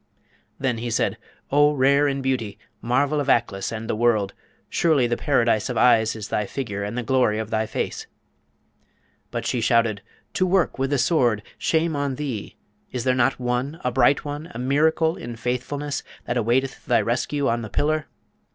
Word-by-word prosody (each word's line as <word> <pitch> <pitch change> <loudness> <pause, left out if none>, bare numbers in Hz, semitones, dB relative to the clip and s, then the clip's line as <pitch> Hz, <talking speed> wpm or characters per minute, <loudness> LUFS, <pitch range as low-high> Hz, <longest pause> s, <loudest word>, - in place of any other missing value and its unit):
Then 125 -4 -1
he 120 +1 -3
said, 115 - 0 0.3
'O 145 +1 +5
rare 140 +2 +4
in 135 -1 -2
beauty! 125 -6 -1 0.2
marvel 140 +5 +1
of 140 -1 -2
Aklis 105 -6 +1
and 115 0 -5
the - - -1
world! 110 -4 +2 0.3
surely 155 -7 +2
the 120 0 0
paradise 115 -5 +1
of 125 - -2
eyes 115 -3 +4
is 110 -3 -7
thy 105 -1 -1
figure 105 -6 -4
and 105 +4 -4
the 125 - -1
glory 125 -3 +2
of 110 0 -4
thy 110 0 0
face!' - - -4 1.2
But - - -4
she 120 - 0
shouted, 115 -3 +2 0.3
'To 185 - +1
work 180 -6 +1
with 135 0 0
the 145 - +1
Sword! 125 -6 +2 0.2
Shame 160 -1 +1
on 140 -2 -1
thee! 130 -7 -5 0.4
is 125 -2 -3
there 130 0 +2
not 125 0 +1
one, 125 +5 -2
a 125 - 0
bright 130 +4 +3
one, 145 +3 -5
a - - -4
miracle 160 +5 +2
in 120 0 -7
faithfulness, 125 +5 -3 0.2
that 120 - -2
awaiteth 125 +3 0
thy 120 - +4
rescue 135 +4 0
on 115 0 0
the 110 - -6
pillar?' 155 +7 0
125 Hz, 180 wpm, -23 LUFS, 115-145 Hz, 1.2 s, O